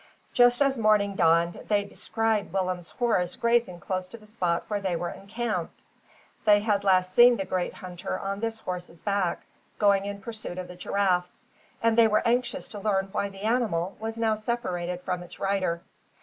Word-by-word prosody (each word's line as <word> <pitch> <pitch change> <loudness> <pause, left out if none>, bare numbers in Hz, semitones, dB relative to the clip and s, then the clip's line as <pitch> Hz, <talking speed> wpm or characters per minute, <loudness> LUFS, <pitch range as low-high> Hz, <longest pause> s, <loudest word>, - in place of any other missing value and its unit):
Just 245 +2 +5
as 270 -2 +1
morning 210 -2 +3
dawned, 170 0 +3
they 205 -1 +2
descried 220 0 -1
Willem's 185 -2 -2
horse 185 -8 0
grazing 235 -7 +1
close 185 0 -3
to 230 - -10
the 215 - -17
spot 180 -5 -1
where 205 -1 -2
they 190 -3 -1
were 175 +1 -3
encamped. 205 -3 -4 0.6
They 205 -2 +5
had 205 -2 +1
last 185 -1 +3
seen 240 +2 +7
the 195 - -2
great 185 -1 -2
hunter 180 +1 -5
on 195 0 -4
this 225 0 -2
horse's 180 -5 -7
back, 200 -4 0 0.3
going 200 -2 +3
in 200 0 -5
pursuit 215 -5 -7
of 185 -1 -5
the 180 - -9
giraffes; 180 +3 -1 0.4
and 230 -1 +4
they 230 -1 +6
were 215 0 +1
anxious 245 +2 0
to 210 - -7
learn 195 -2 0
why 200 0 -1
the 195 0 -12
animal 215 -6 0
was 225 +1 -4
now 225 -1 +2
separated 180 -6 -3
from 180 -1 -3
its 175 - -12
rider. 190 -4 0
200 Hz, 180 wpm, -27 LUFS, 180-225 Hz, 0.6 s, seen